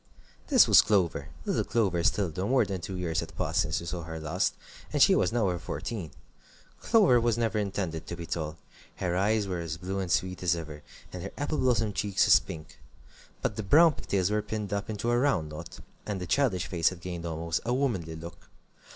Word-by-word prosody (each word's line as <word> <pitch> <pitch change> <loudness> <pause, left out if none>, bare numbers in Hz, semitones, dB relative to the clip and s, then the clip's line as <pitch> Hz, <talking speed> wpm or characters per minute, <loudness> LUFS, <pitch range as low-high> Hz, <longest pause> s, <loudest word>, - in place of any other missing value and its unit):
This - - +6
was - - +8
Clover, 95 -6 +1 0.2
little - - 0
Clover 100 -7 +1
still, 95 -2 +1
though 90 +6 -3
more 130 +2 +3
than 95 -3 -4
two 95 - -5
years 85 -2 -1
had 80 -2 -7
passed - - +1
since 80 - -1
we 85 - -8
saw 85 0 -4
her 80 0 -7
last, 80 +4 -1 0.4
and - - -1
she - - +7
was 90 - +2
now 115 -2 +1
over 90 -2 0
fourteen. 95 0 -5 0.7
Clover 195 - +4
was 115 -1 +1
never 115 -3 0
intended 95 -6 -3
to 85 - -4
be 85 -1 -7
tall. 80 -1 -4 0.4
Her 90 -2 -2
eyes 105 +2 +1
were 90 -2 -3
as 80 -1 -4
blue 95 +3 -4
and 95 -3 -3
sweet 90 +1 0
as 90 -1 +2
ever, 80 -3 -7 0.3
and 90 - -6
her 95 - -5
apple 145 +1 -2
blossom 115 -5 +2
cheeks 100 -1 +1
as - - +7
pink. 80 -1 -10 0.6
But 105 - -1
the - - -1
brown 155 - +6
pig - - -11
tails 95 0 +1
were 105 0 +1
pinned 105 -1 -4
up 100 +1 -3
into 110 +2 -1
a 120 - +3
round 120 - +1
knot, 75 +2 -9 0.3
and 105 -2 -2
the 90 - -4
childish 95 -2 +1
face 85 -3 +2
had 95 - -9
gained 85 -1 -5
almost 85 0 -2
a 120 - -2
womanly 110 - -1
look. 85 +1 -11
95 Hz, 220 wpm, -28 LUFS, 85-110 Hz, 0.7 s, was